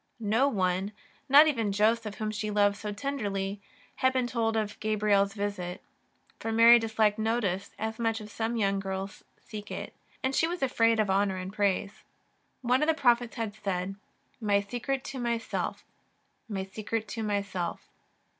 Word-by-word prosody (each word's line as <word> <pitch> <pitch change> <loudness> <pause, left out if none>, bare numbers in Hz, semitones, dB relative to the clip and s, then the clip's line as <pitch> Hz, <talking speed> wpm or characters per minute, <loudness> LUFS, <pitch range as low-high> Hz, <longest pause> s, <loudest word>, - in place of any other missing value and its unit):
No 225 +5 +2
one, 190 -3 0 0.4
not 290 +3 +9
even 230 -9 +1
Joseph 215 +1 +1
whom 215 0 -3
she 215 0 -3
loved 205 -1 +3
so 210 0 -5
tenderly, 205 -5 -3 0.4
had 260 - +3
been 255 -1 +1
told 225 -2 0
of 210 -1 -2
Gabriel's 210 -2 +2
visit, 200 -3 -3 0.6
for 225 - -3
Mary 230 +1 +8
disliked 220 -1 +1
notice 215 -4 -1
as 220 +2 -4
much 225 -1 0
as 215 -1 -10
some 225 +2 -2
young 200 -3 +1
girls 195 0 -5
seek 210 -2 -9
it, - - -6 0.3
and 265 +1 +1
she 325 - +3
was 345 -3 -3
afraid 230 -3 +3
of 210 -3 +2
honour 195 -1 +2
and 185 +1 -6
praise. 200 +1 -1 0.6
One 250 +2 +3
of 300 - +2
the 320 - +3
prophets 240 -4 +2
had 225 -4 -3
said: 195 -3 -3 0.3
" - - -40
My 205 -2 +3
secret 245 +6 -3
to 265 - -6
myself, 235 -1 -2 0.6
my 195 -3 -2
secret 215 +3 -4
to 225 +3 -4
myself." 200 -4 -2
215 Hz, 165 wpm, -29 LUFS, 200-230 Hz, 0.6 s, not